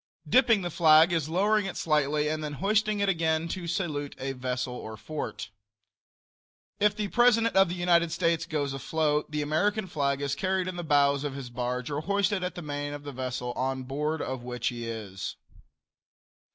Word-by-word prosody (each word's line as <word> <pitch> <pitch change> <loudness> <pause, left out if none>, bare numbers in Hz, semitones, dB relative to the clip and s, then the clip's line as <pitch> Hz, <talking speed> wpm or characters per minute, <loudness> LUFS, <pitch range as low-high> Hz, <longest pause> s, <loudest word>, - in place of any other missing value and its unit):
Dipping 230 -6 +4
the 175 - -3
flag 160 +1 +6
is 160 -3 0
lowering 205 +4 +2
it 190 - -5
slightly 150 -1 +1
and 155 0 -2
then 150 -1 -4
hoisting 210 +5 +1
it 200 - +2
again 165 -3 +1
to 175 -1 -4
salute 160 -6 -2
a 135 +1 -3
vessel 125 -1 -3
or 110 -3 -7
fort. 140 -4 -6 1.3
If 210 0 +3
the 210 -1 -2
President 230 -1 +4
of 195 -2 +5
the 175 - -3
United 170 -2 +3
States 165 -1 0
goes 145 -4 -1
afloat 150 +2 0
the 150 -1 -2
American 200 +8 +1
flag 140 -6 -1
is 140 -1 -1
carried 190 -1 0
in 185 - -4
the 175 - -4
bows 140 -2 +3
of 145 -2 -3
his 130 -3 -7
barge 125 +2 -3
or 145 +1 -2
hoisted 200 +2 0
at 180 - -3
the 175 - -6
main 145 -1 -4
of 145 0 -7
the 145 - -6
vessel 125 -1 -4
on 130 +1 -2
board 150 +4 -2
of 130 -1 -4
which 125 -1 -2
he 120 -1 -6
is. 105 -4 -5
155 Hz, 190 wpm, -28 LUFS, 135-180 Hz, 1.3 s, flag